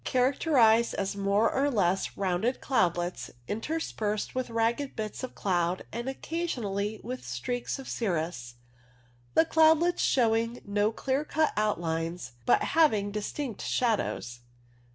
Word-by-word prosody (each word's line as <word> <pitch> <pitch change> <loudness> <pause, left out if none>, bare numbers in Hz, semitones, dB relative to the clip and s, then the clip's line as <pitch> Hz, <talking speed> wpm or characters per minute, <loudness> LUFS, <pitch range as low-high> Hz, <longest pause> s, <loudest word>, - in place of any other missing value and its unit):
Characterized 250 -3 +3
as 195 +1 -2
more 200 +2 +2
or 280 +2 +2
less 195 -6 0
rounded 195 +6 0
cloudlets 175 -8 0 0.2
interspersed 220 -4 -2
with 255 -1 -2
ragged 230 +4 0
bits 215 -2 -4
of 255 - -6
cloud 180 -2 0
and 240 +3 -4
occasion 325 -1 -3
ally 200 +2 -2
with 125 0 -5
streaks 125 - -3
of 270 - -9
cirrus, 160 - -2 0.8
the 320 - +6
cloudlets 320 +2 +4
showing 230 -1 +2
no 205 +1 +1
clear 265 +5 -1
cut 310 0 +1
outlines, 170 -7 -1 0.2
but - - +4
having 220 -11 +3
distinct 215 +3 -4
shadows. 205 - -1
220 Hz, 125 wpm, -28 LUFS, 195-260 Hz, 0.8 s, the